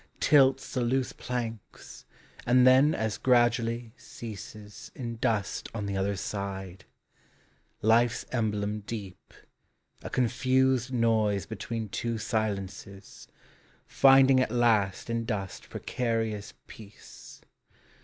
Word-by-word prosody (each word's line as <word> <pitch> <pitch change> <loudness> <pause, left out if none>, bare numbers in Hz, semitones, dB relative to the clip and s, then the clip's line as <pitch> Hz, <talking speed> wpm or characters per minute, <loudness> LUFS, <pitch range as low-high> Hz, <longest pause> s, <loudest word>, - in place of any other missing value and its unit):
Tilts 135 -2 +3
the 130 - 0
loose 125 +2 0
planks, 115 -4 -7 0.4
and 125 +1 +5
then 130 +4 +5
as 110 -1 -2
gradually 120 -2 +1
ceases 105 -2 -10
In 115 -3 -5
dust 105 -3 -1
on 105 -2 -3
the 100 -1 -3
other 100 +1 -1
side; 95 -2 -6 1.0
life's 115 +2 +3
emblem 105 -3 -1
deep, 105 -3 -8 0.7
A - - -7
confused 130 +1 +1
noise 110 -5 +1
between 110 +1 -5
two 115 +3 -3
silences, 100 -3 -4 0.6
Finding 135 -1 +5
at 130 - +1
last 110 -5 +1
in 115 0 -2
dust 100 -4 -5
precarious 115 -4 -3
peace. 105 -2 -14
115 Hz, 105 wpm, -28 LUFS, 105-125 Hz, 1.0 s, and